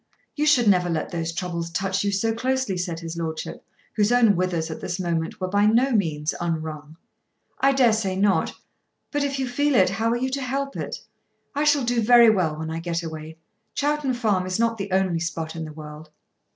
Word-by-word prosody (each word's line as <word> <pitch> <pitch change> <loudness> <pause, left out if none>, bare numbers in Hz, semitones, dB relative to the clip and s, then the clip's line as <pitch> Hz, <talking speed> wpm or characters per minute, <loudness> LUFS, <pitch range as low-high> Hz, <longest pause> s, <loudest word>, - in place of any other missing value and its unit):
"You 300 0 0
should 250 -6 +4
never 180 -3 +4
let 160 -2 -2
those 165 -2 -2
troubles 170 -1 -4
touch 190 +3 -1
you 200 - +1
so 225 +3 0
closely," 260 -3 -1
said 175 -2 -3
his 165 0 -6
lordship, 160 -1 -5 0.3
whose 210 +1 +2
own 235 -4 +5
withers 175 -3 -1
at - - -7
this 175 - -4
moment 165 -2 -2
were 185 - -2
by 205 +2 +3
no 240 +5 +3
means 160 -8 0
unwrung. 155 -2 -4 0.6
"I 275 - +4
dare 250 -4 +4
say 200 -4 -1
not. 195 +1 +2 0.6
But 290 -1 0
if 275 -1 -1
you 265 -1 -1
feel 285 +3 +1
it, 185 -4 +4
how 220 +3 0
are 235 - +1
you 260 +2 -2
to 275 +1 -2
help 275 +2 -3
it? - - -5 0.5
I 290 +1 0
shall 295 -2 +4
do 240 0 +1
very 235 0 +7
well 170 -7 0
when 160 0 -4
I 165 - -3
get 170 0 -3
away. 160 0 -7 0.4
Chowton 290 -2 0
Farm 205 -6 0
is 185 - -1
not 230 -1 +1
the 195 0 -4
only 190 -3 +1
spot 165 -1 -4
in 160 -1 -4
the 155 - -8
world." 150 0 -10
190 Hz, 210 wpm, -24 LUFS, 165-240 Hz, 0.6 s, very